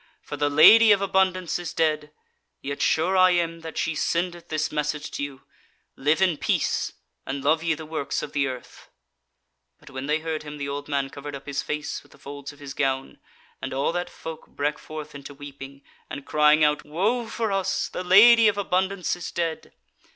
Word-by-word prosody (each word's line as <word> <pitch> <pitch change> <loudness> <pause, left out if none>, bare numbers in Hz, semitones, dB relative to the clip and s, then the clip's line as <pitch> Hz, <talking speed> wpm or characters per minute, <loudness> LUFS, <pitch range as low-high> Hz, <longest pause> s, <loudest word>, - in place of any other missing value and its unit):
for - - -6
the 145 0 +1
Lady 215 +10 +8
of 205 - +5
Abundance 190 -3 +1
is 175 - -6
dead; 155 -2 0 0.5
yet 140 +1 -5
sure 180 +4 +2
I 185 0 +6
am 165 -1 -1
that 160 0 -8
she 165 - 0
sendeth 170 +3 -2
this 155 -1 -2
message 150 0 -2
to - - -4
you, 140 -1 -7 0.5
Live 150 +6 +2
in 175 -5 +2
peace, - - 0 0.3
and 135 0 -5
love 155 +2 +3
ye 165 -1 0
the 160 +1 -9
works 155 -2 -3
of 145 - -7
the 140 -2 +1
earth." 130 -2 -9 0.9
But - - -15
when 130 +1 -6
they 150 +1 +2
heard 160 -1 -4
him, 150 -1 -8
the 140 -1 -4
old 145 +1 -5
man 140 -2 -1
covered 145 0 -7
up 135 - -10
his 140 -1 -2
face 150 0 -4
with - - -21
the - - -18
folds 140 0 -8
of 145 - -17
his 140 -2 -8
gown, 135 -1 -2 0.4
and - - -4
all 135 +4 +1
that 175 +1 -3
folk 160 -1 -9
brake 150 +1 -2
forth 155 -1 -8
into 140 0 -10
weeping, 140 -1 -10 0.3
and 140 - -7
crying 150 0 +4
out: 150 0 +2
"Woe 210 +10 -1
for 225 -2 -2
us! 195 -1 0
the - - -5
Lady 220 +5 +7
of 205 -1 +2
Abundance 190 -2 0
is 175 - -6
dead!" 165 -2 -3
155 Hz, 200 wpm, -25 LUFS, 145-175 Hz, 0.9 s, Lady